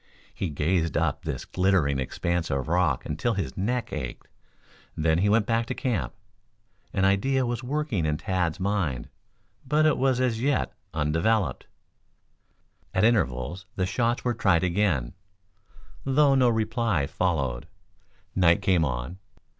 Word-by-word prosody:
He 95 - -3
gazed 80 +3 0
up - - -1
this - - -4
glittering 90 -8 +1
expanse 85 +5 -2
of 70 +1 -1
rock 85 -6 +1
until 90 +10 -1
his 80 -10 -3
neck 120 +6 -2
ached, 65 -2 -5 0.7
then 80 +1 +2
he 100 +3 +2
went 105 0 +3
back 115 0 0
to - - -3
camp. 110 - -2 0.8
An 95 - +1
idea 130 +7 +2
was 120 +1 -3
working 130 - -1
in 75 0 0
Tad's 90 0 -1
mind, 95 -10 -1 0.5
but 150 +4 +2
it 155 - +3
was 130 -1 +2
as 120 -3 0
yet 140 +1 0 0.2
undeveloped. 80 +7 0 1.3
At 95 - +3
intervals 95 - +1
the 95 - 0
shots 115 +6 0
were 120 - +2
tried 95 -7 +2
again, 90 -9 +1 0.9
though 140 +1 +4
no 130 -2 +4
reply 110 - 0
followed. 70 -7 -1 0.7
Night 85 -3 +3
came 90 -4 +3
on. 65 +6 -3
95 Hz, 140 wpm, -26 LUFS, 80-115 Hz, 1.3 s, though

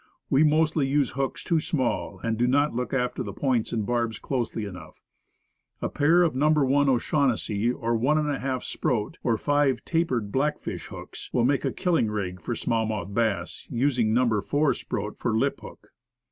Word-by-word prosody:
We 135 +3 +5
mostly 155 -1 +3
use 140 -1 +1
hooks 135 0 -3
too 165 -2 +2
small, 145 -6 -1
and 115 -1 0
do 120 +2 +1
not 145 +2 +2
look 125 +1 -3
after 125 -1 -1
points 125 -1 0
and 110 -3 -1
barbs 120 -1 -1
closely 120 -4 -2
enough. 90 -6 -10 0.8
A - - -2
pair 165 +5 +4
of 165 - +1
No. 145 +4 +2
1 145 -2 +3
O'Shaughnessy, 120 -4 +1
or 115 -1 -1
ij4 135 0 0
Sproat, 110 -4 -2
or 115 -2 +1
five 145 -2 +1
tapered 130 -11 0
black 145 +5 +1
fish - - -6
hooks, - - -9
will 120 - +2
make 135 +1 +1
a - - +1
killing 165 - +1
rig 95 -4 -4
for 120 - -3
small 115 -2 0
mouthed 100 -3 -4
bass, 100 -6 -1
using 125 -3 +1
No. 115 -3 +2
4 145 +6 +1
Sproat 105 +1 -5
for 110 -2 0
lip 140 +4 0
hook. - - -13
125 Hz, 175 wpm, -26 LUFS, 110-145 Hz, 0.8 s, We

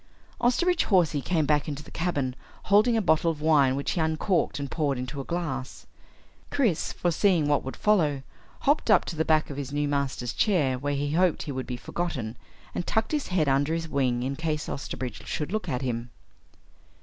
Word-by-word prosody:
Osterbridge 340 +9 +2
Hawsey 170 -8 +3
came 160 0 +1
back 150 0 +2
into 150 0 -5
the - - -14
cabin 145 -7 -1 0.3
holding 215 +4 +4
a 220 - +1
bottle 160 -1 +3
of 160 -2 -3
wine 145 -4 +4
which 140 - -2
he 170 - 0
uncorked 160 +3 0
and 140 -1 -5
poured 145 -5 0
into 130 +3 -4
a - - -6
glass. 140 -6 -4 0.6
Chris, 230 - +1
foreseeing 175 -2 +2
what 145 -1 +2
would 135 - -5
follow, 155 -10 +2 0.4
hopped 285 -3 +2
up 215 - +5
to 170 - -5
the 160 - +1
back 155 -2 +2
of 140 - -7
his 140 -1 -4
new 145 0 0
master's 140 -4 -1
chair 145 - +2
where 145 +1 -1
he 145 +1 -1
hoped 175 +1 +2
he 150 - -5
would 130 -1 -4
be 125 -1 -4
forgotten, 125 -6 -4 0.4
and 175 - -3
tucked 220 0 0
his 300 -2 -1
head 175 -5 +1
under 140 +4 +2
his 165 0 -3
wing 130 -5 0
in 135 +2 -2
case 155 0 -2
Osterbridge 125 -4 -5
should 150 +3 -3
look 215 -4 -2
at 125 -1 -2
him. 120 -1 -3
150 Hz, 195 wpm, -27 LUFS, 135-175 Hz, 0.6 s, up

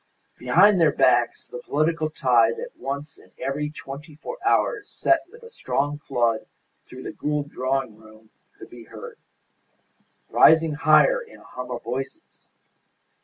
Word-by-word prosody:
Behind 180 +9 +4
their 160 -3 +5
backs 120 -3 +2
the 125 - -8
political 155 +4 0
tide 120 -6 +2
that - - -8
once 140 +3 -6
in - - -20
every 150 +2 -3
twenty 150 +1 -10
four 475 - -8
hours 415 -4 +1
set 335 - +2
with 470 +1 -16
a 465 - -13
strong 145 - -2
flood 120 -5 -1 0.4
through - - -11
the - - -5
Gould 145 -1 -3
drawing 130 -3 -2
room 110 0 -18 0.3
could - - -13
be 120 -1 -12
heard, - - -11 1.1
rising 160 0 +5
higher 155 - +4
in 475 0 -14
a - - -18
hum 125 0 -8
of 120 -1 -5
voices. 135 - -7
145 Hz, 150 wpm, -24 LUFS, 125-160 Hz, 1.1 s, their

